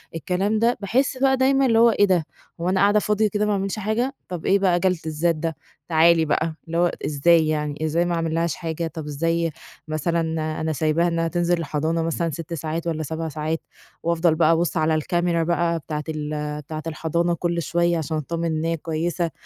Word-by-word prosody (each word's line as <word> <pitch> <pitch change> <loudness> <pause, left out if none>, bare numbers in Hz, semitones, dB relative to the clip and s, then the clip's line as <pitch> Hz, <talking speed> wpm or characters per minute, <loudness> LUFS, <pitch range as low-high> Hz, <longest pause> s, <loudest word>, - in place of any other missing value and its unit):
الكلام 190 +7 0
ده، 235 +2 +2
باحس 255 +6 +1
بقى 265 0 +3
دايمًا 270 +1 +3
اللي 225 -2 +4
هو 235 0 +7
إيه 205 -2 +4
ده، 180 -5 +2 0.4
هو 175 - 0
أنا 190 0 +1
قاعدة 205 +1 +4
فاضية 210 +1 +1
كده، 210 +1 0
ما 210 - +1
باعملش 195 +1 -1
حاجة، 225 +6 -1
طَب 180 -3 -6
إيه 200 +1 +4
بقى 180 -3 +3
جَلد 185 -2 +1
الذات 160 +2 0
ده، 160 0 -3 0.3
تعالي 165 0 +4
بقى، 160 +1 0
اللي 165 +1 -2
هو 175 0 +3
إزاي 160 +2 +3
يعني، 150 0 -2
إزاي 170 +3 +1
ما 175 -1 0
أعملّهاش 165 0 0
حاجة، 165 -1 -3
طَب 160 -1 -7
إزاي 165 +3 0 0.4
مثلًا 165 +2 0 0.4
أنا 160 0 -1
سايباها 155 +4 +1
إنّها 165 -1 0
تنزل 175 +1 +1
الحضانة 160 +2 -1
مثلًا 165 +1 -1
6 165 +2 -6
ساعات، 165 +1 -3
والّا 160 -1 -1
7 160 +2 -4
ساعات، 155 +2 -3 0.4
وأفضل 170 -1 +2
بقى 160 0 +4
أبُص 170 +1 +1
على 155 0 +2
الCamera 175 0 0
بقى 170 -1 +1
بتاعة 150 0 -4
ال 150 -1 -3
بتاعة 155 +1 -7
الحضانة 170 +2 0
كل 170 0 -1
شويّة، 170 +1 +1
عشان 155 0 -2
أتطمن 170 +3 -3
إن 160 0 -1
هي 165 0 0
كويّسة، 165 +1 -2
165 Hz, 195 wpm, -23 LUFS, 155-175 Hz, 0.4 s, هو